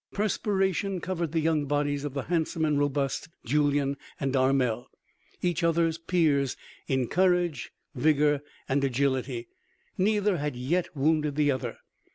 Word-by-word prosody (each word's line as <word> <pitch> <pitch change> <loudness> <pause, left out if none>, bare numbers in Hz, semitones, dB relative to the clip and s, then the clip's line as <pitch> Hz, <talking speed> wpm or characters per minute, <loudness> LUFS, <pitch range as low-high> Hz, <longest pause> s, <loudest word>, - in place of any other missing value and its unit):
Perspiration 195 -2 0
covered 170 -3 -3
the 165 0 +1
young 155 -2 +1
bodies 145 0 0
of 145 -2 -5
the 140 - -2
handsome 165 -1 0
and 150 -2 +2
robust 145 +1 -1 0.2
Julyan 145 +1 +1 0.2
and 135 -1 -1
Armel. 130 -3 +2 0.6
Each 175 -1 0
other's 165 -1 +2
peers 155 -6 +1 0.3
in 130 -3 +1
courage, 175 -6 +1 0.2
vigor 150 +1 +3 0.3
and 140 +1 +1
agility, 130 -2 0 0.5
neither 205 -1 +2
had 150 -3 -2
yet 160 +9 0
wounded 150 0 +1
the 145 -1 +3
other. 130 -3 -3
150 Hz, 135 wpm, -28 LUFS, 135-170 Hz, 0.6 s, vigor